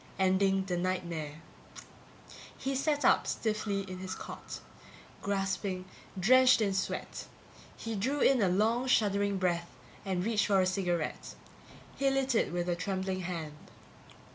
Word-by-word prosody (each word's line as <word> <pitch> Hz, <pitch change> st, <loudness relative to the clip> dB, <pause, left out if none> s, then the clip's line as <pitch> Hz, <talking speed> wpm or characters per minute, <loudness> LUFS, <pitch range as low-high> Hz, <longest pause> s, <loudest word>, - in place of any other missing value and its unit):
Ending 190 Hz, 0 st, +2 dB
the 180 Hz, -2 st, -1 dB
nightmare. 170 Hz, -4 st, -3 dB, 1.1 s
He 270 Hz, -, -2 dB
sat 290 Hz, +2 st, 0 dB
up -, -, +4 dB
stiffly 215 Hz, -2 st, -1 dB
in 185 Hz, -1 st, -7 dB
his 185 Hz, 0 st, -5 dB
cot, -, -, -8 dB, 0.6 s
gasping, 195 Hz, -1 st, -1 dB, 0.3 s
drenched 255 Hz, +6 st, +6 dB
in 205 Hz, -3 st, +1 dB
sweat. 190 Hz, -, -3 dB, 0.5 s
He 225 Hz, -, -4 dB
drew 260 Hz, +9 st, 0 dB
in 270 Hz, -4 st, +4 dB
a 190 Hz, -, +3 dB
long 225 Hz, +7 st, +2 dB
shuddering 200 Hz, -4 st, +2 dB
breath 175 Hz, -2 st, 0 dB, 0.3 s
and 185 Hz, -2 st, -1 dB
reached 215 Hz, -2 st, +2 dB
for 195 Hz, -2 st, +4 dB
a 185 Hz, -, +4 dB
cigarette. 180 Hz, -3 st, -2 dB, 0.6 s
He 275 Hz, 0 st, +2 dB
lit 270 Hz, -1 st, +1 dB
it 225 Hz, -, +2 dB
with 175 Hz, 0 st, -2 dB
a 175 Hz, -, +1 dB
trembling 190 Hz, +1 st, -2 dB
hand. 165 Hz, -5 st, -6 dB
195 Hz, 140 wpm, -31 LUFS, 185-220 Hz, 1.1 s, drenched